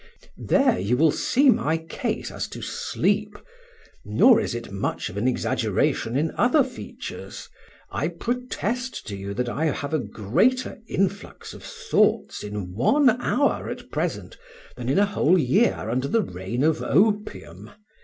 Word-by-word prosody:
There 270 -4 +3
you 120 +5 0
will 155 +2 +4
see 270 - +3
my 165 -9 +1
case 165 0 -4
as - - -4
to - - -9
sleep; - - -1 0.7
nor 250 -4 +5
is - - -3
it 115 -3 -6
much 95 - -3
of - - -12
an 110 +5 0
exaggeration 125 -1 0
in 155 +3 0
other - - +4
features. - - -8 0.4
I 125 +11 -1
protest 245 +5 -3
to 100 - -4
you 100 +1 -6
that 125 +2 -1
I 145 +6 -1
have 145 -1 -2
a 155 - +2
greater 180 - 0
influx 195 +1 -3
of - - -11
thoughts - - 0
in 105 -3 -5
one 255 - +4
hour 285 +3 +1
at - - -8
present - - -3 0.4
than 120 - -5
in 135 - +2
a 205 - +5
whole 185 -3 +2
year 180 - +3
under 130 +4 -1
the 225 +7 +2
reign 95 - -4
of 160 0 +2
opium. 210 +1 0
160 Hz, 155 wpm, -24 LUFS, -, 0.7 s, nor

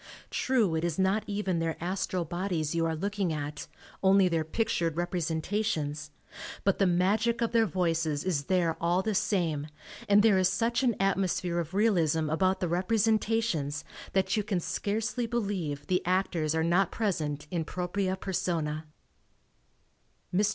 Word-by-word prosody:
True 235 -9 +1
it 160 0 -1
is 170 -3 -1
not 195 +3 +2
even 200 -4 -1
their 165 -1 -1
astral 185 0 -2
bodies 175 -2 -2
you 165 0 +1
are 160 - -1
looking 200 +1 -1
at, 150 -1 -4 0.3
only 195 0 +5
their 165 -2 +1
pictured 165 -2 -1
representations, 165 -3 -1 0.5
but 195 - +2
the 195 - +4
magic 205 +7 +2
of 230 -1 0
their 230 -1 +3
voices 165 -4 0
is 160 -7 -1
there 175 -3 +1
all 175 +3 +2
the 220 - 0
same 165 -7 0 0.4
and 205 0 +6
there 210 -4 +5
is 185 - +3
such 235 +2 0
an 245 -4 +2
atmosphere 185 -2 0
of 170 +2 -4
realism 165 -8 +2
about 185 +4 +1
the 180 - +1
representations 200 -5 +1 0.3
that 190 +3 +2
you 215 - +2
can 200 -3 -1
scarcely 225 +7 -2
believe 195 -11 -2
the 180 +2 0
actors 175 -4 0
are 160 - +1
not 175 +3 +3
present 155 -10 -2
in 170 -3 -1
propriae 185 +3 -2
personae. 165 -5 -2 1.5
Mr. 205 +3 +3
180 Hz, 150 wpm, -29 LUFS, 160-200 Hz, 1.5 s, and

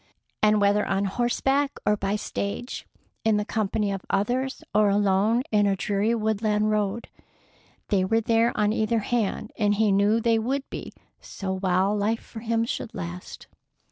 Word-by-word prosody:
And 215 0 +4
whether 205 +1 +3
on 195 +1 0
horseback 270 +6 0
or 210 - +3
by 200 0 -1
stage, 210 +3 -4 0.4
in 220 -1 +3
the 210 - -1
company 210 -1 -1
of 195 -1 -4
others 245 +7 -1
or 210 -1 +4
alone 205 +4 +2
in 205 -1 +3
a 195 - +2
dreary 205 +3 0
woodland 215 -1 0
road, 210 +1 -1 0.8
they 195 -3 +2
were 225 +4 +2
there 230 +1 +2
on 210 0 +2
either 220 +1 +1
hand, 220 -1 -1
and 205 -1 +3
he 215 0 +2
knew 205 +3 +3
they 230 0 +2
would 265 +5 -2
be - - -6 0.3
so 190 -1 -5
while 190 +2 +1
life 215 +2 0
for 225 - -10
him 230 0 0
should 230 - -5
last. 175 -1 -7
210 Hz, 165 wpm, -25 LUFS, 200-225 Hz, 0.8 s, And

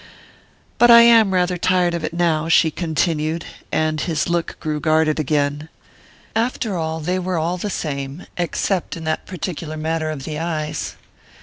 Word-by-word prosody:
"But 240 - +6
I 235 0 +10
am 230 -4 +6
rather 180 -1 +1
tired 180 -1 +2
of 170 -2 -3
it - - -2
now," 165 -2 0
she 160 -1 +4
continued, 160 0 -1 0.3
and 155 -1 0
his 155 +2 -1
look 170 -1 -2
grew 155 -2 -2
guarded 155 0 +2
again. 145 +1 -1 0.7
After 225 -2 -1
all, 160 -1 -2
they 180 +4 -1
were 185 -1 -2
all 170 +3 -1
the 205 +4 -3
same 140 -2 -4
except 175 +1 -1
in 165 - -8
that 155 0 -2
particular 165 -3 -5
matter 160 0 -1
of 150 -3 -5
the 150 +1 -4
eyes. 155 -2 -3
165 Hz, 165 wpm, -20 LUFS, 155-180 Hz, 0.7 s, I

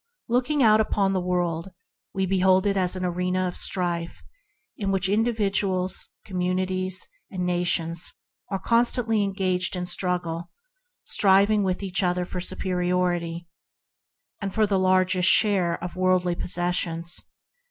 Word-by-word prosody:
Looking 255 +4 +1
out 215 -1 +5
upon 200 -2 0
the 185 - 0
world, 175 -1 -1 0.4
we 190 0 -1
behold 190 0 +3
it 200 -1 +1
as 185 -1 +1
an 185 0 -3
arena 180 +1 -1
of 180 - -5
strife 170 -2 -2 0.5
in 200 -2 -3
which 190 -1 +1
individuals, 200 -3 0 0.2
communities, 185 0 -1 0.2
and 180 -3 -3
nations 175 -1 0 0.4
are 195 - -1
constantly 230 +1 +2
engaged 190 -2 0
in 180 0 -3
struggle, 175 -2 -1 0.5
striving 200 +2 +3
with 190 0 -1
each 190 0 0
other 180 -1 0
for 180 0 -5
superiority 175 -2 -1 0.9
and 195 -1 -3
for 215 +2 +2
the 195 -2 +1
largest 185 0 +3
share 190 -4 +3
of 180 - -6
worldly 185 -1 +2
possessions. 175 -1 -1
185 Hz, 130 wpm, -25 LUFS, 180-195 Hz, 0.9 s, out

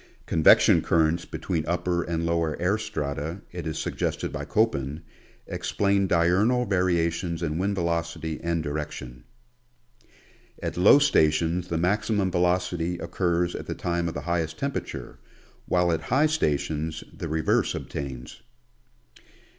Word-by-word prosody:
Convection 80 -2 +5
currents 80 +1 +2
between 85 -5 -3
upper 90 0 0
and 85 0 -2
lower 85 -2 0
air 95 +5 +1
strata, 75 -1 -4
it 90 -2 -6
is 80 0 -3
sug - - -3
gested - - -2
by - - -4
Koppen, 70 +4 0 0.4
explain 100 -1 0
diurnal 95 +9 +3
variations 85 -3 0
in 80 0 -1
wind 100 +2 0
velocity 85 -2 -2
and 85 -1 -1
direction. 70 -5 -5 1.4
At - - -3
low 90 +9 +7
stations 85 - +2
the 85 - -2
maximum 100 +2 +1
velocity 90 -1 0
occurs 85 0 0
at - - -6
the - - -3
time 85 0 -1
of 80 - -4
the - - -3
highest 85 -2 -2
temperature, 135 - -4 0.5
while 90 -1 +2
at 80 -1 0
high 130 - +2
stations 80 - -1
the - - -5
reverse 80 0 +1
obtains. 65 -3 -6
85 Hz, 130 wpm, -26 LUFS, 80-90 Hz, 1.4 s, low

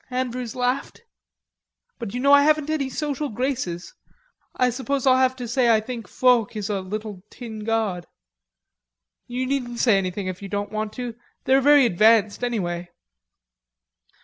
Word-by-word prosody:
Andrews 250 -2 -3
laughed. 250 - -2 1.0
"But 230 -2 -6
you - - -2
know 280 +2 +4
I 285 - +8
haven't 305 0 +2
any 280 -4 -1
social 295 +1 -3
graces.... 235 -8 -3 0.6
I 250 0 +2
suppose 265 +2 -2
I'll 260 -1 +5
have 260 0 +2
to 250 -2 -6
say 240 +1 +2
I 225 -1 +5
think 230 0 -7
Foch 245 -4 +2
is 210 -1 -3
a 195 -2 -1
little 205 0 -6
tin 225 -3 -8
god." 215 -6 -1 1.2
"You 250 +1 -3
needn't 250 -3 -2
say 225 -5 +4
anything 185 +1 -3
if 185 0 -5
you 200 - -7
don't 205 0 -3
want 215 0 -3
to.... 245 -2 -5 0.3
They're 265 +1 +4
very 290 -1 +6
advanced, 215 +2 +3
anyway." 175 -7 -2
240 Hz, 155 wpm, -23 LUFS, 210-260 Hz, 1.2 s, I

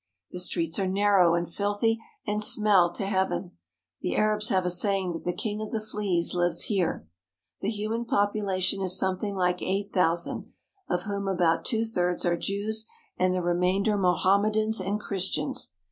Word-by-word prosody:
The 180 - -5
streets 170 -2 0
are 190 - 0
narrow 190 -3 +4
and 170 0 -1
filthy 205 +5 0 0.3
and 210 0 -1
smell 205 -5 +4
to 195 - -3
heaven. 190 -2 -1 0.5
The - - -2
Arabs 215 0 +2
have 185 -2 +1
a 180 - +1
saying 190 0 +1
that 165 - -7
the 175 - +1
king 210 +3 -4
of 215 - -4
the 225 - -1
fleas 205 -5 -1
lives 175 -1 +1
here. 180 - -1 0.5
The 200 - -2
human 220 +2 -2
population 200 -3 +1
is 185 0 0
something 190 +2 -1
like 180 -1 0
eight 200 +2 -2
thousand, 175 -2 0 0.4
of 180 0 0
whom 200 -1 -3
about 175 -4 +1
two 225 -2 +1
thirds 180 -6 -1
are 175 0 +2
Jews 215 +5 -2 0.3
and 185 0 +2
the 180 - -1
remainder 180 +4 +1
Mohammedans 205 +3 +2
and 200 +3 -1
Christians. 190 -7 -2
195 Hz, 165 wpm, -27 LUFS, 180-210 Hz, 0.5 s, narrow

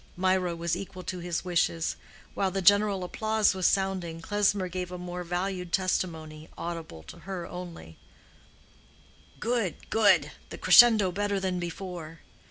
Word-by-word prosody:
Mirah 185 -1 +1
was 170 0 -1
equal 185 0 -7
to 180 0 -5
his 175 0 -3
wishes. 170 -2 0 0.4
While 195 - 0
the 190 0 -3
general 205 0 +4
applause 215 +3 +1
was 185 -1 +1
sounding, 190 -4 -1
Klesmer 205 +1 +1
gave 180 0 -5
a 180 - -5
more 180 0 -6
valued 180 0 -3
testimony, 160 -5 -2
audible 165 - -6
to 80 - -12
her 190 -3 -6
only—"Good, 180 - -8
good—the 220 -2 +2
crescendo 220 -6 +7
better 205 +1 -1
than 185 -1 -2
before." 170 -2 -7
180 Hz, 130 wpm, -28 LUFS, 170-195 Hz, 0.4 s, crescendo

